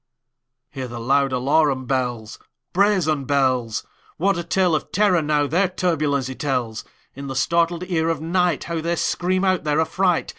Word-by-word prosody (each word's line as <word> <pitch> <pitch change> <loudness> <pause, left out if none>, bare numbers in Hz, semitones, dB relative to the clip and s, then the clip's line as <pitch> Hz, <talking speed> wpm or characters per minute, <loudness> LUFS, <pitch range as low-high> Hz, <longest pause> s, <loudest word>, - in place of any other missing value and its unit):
Hear 135 -3 -5
the 120 0 -7
loud 135 +3 +2
alarum 135 +1 +1
bells, 120 -4 -2 0.3
Brazen 180 -8 +2
bells! 130 -5 0 0.3
What 195 +4 +2
a 170 - -3
tale 180 0 +1
of 155 - -2
terror, 195 -4 +3
now, 150 -1 +1
their 180 +7 +2
turbulency 150 -8 -1
tells! 125 -5 -2 0.3
In 140 +1 -8
the 135 - -5
startled 170 +5 +1
ear 165 -3 0
of 165 - 0
nightHow 170 -1 0
they 170 +2 -1
scream 185 +3 0
out 185 -1 +1
their 150 0 +1
affright! 175 +2 +1
155 Hz, 155 wpm, -22 LUFS, 135-175 Hz, 0.3 s, terror